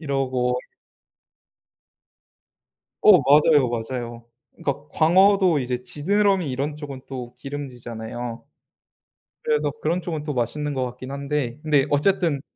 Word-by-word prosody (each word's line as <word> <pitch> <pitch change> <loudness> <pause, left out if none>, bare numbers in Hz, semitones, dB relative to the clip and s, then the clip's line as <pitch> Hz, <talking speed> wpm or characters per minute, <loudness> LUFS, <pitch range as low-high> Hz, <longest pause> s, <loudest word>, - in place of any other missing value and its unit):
이러고 130 -4 0 2.5
어. 195 -7 +7
맞아요. 145 -1 +5
맞아요. 120 0 -5 0.3
그러니까 145 +1 -4
광어도 185 0 +4
이제 125 -1 -2
지느러미 180 +7 0
이런 140 +3 -2
쪽은 140 -3 -8
또 125 -2 -7
기름지잖아요. 120 -4 -6 1.0
그래서 150 -1 +1
그런 170 +4 0
쪽은 160 -3 -4
또 150 -1 -3
맛있는 145 +5 -2
것 130 -1 -1
같긴 125 +1 -8
한데. 140 -2 -3
근데 150 -3 +3
어쨌든 160 -1 +2
140 Hz, 265 characters per minute, -23 LUFS, 125-155 Hz, 2.5 s, 어